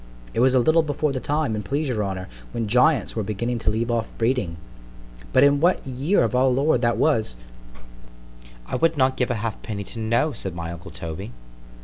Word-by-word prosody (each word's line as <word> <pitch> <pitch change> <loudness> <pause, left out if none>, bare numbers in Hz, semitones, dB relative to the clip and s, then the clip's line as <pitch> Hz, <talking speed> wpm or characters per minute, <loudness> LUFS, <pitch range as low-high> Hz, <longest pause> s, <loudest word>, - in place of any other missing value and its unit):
_ - - -18
——It - - -1
was 130 +2 +4
a - - +6
little 155 +7 +4
before 150 -1 -1
the 130 - -2
time, 145 -4 -1
an' 105 - -2
please 140 +9 -2
your 110 -4 0
honour, 95 -2 -4 0.3
when 115 -2 -2
giants 125 - +3
were 110 - 0
beginning 115 +4 -2
to - - 0
leave 115 +3 -1
off 115 -1 -1
breeding:—but - - -2
in 140 0 +5
what 175 +4 +2
year 135 +8 +1
of 115 +1 0
our 130 +1 +4
Lord 130 0 +2
that 120 -1 +1
was— 110 - +1 1.3
I - - -3
would 165 -1 +2
not 130 -1 +3
give 125 - 0
a 125 - 0
halfpenny 105 -1 -4
to 115 - -8
know, 115 +7 +1
said 95 - -5
my 85 -1 -5
uncle 85 +3 -9
_Toby. 80 -8 -7
115 Hz, 205 wpm, -23 LUFS, 100-135 Hz, 1.3 s, a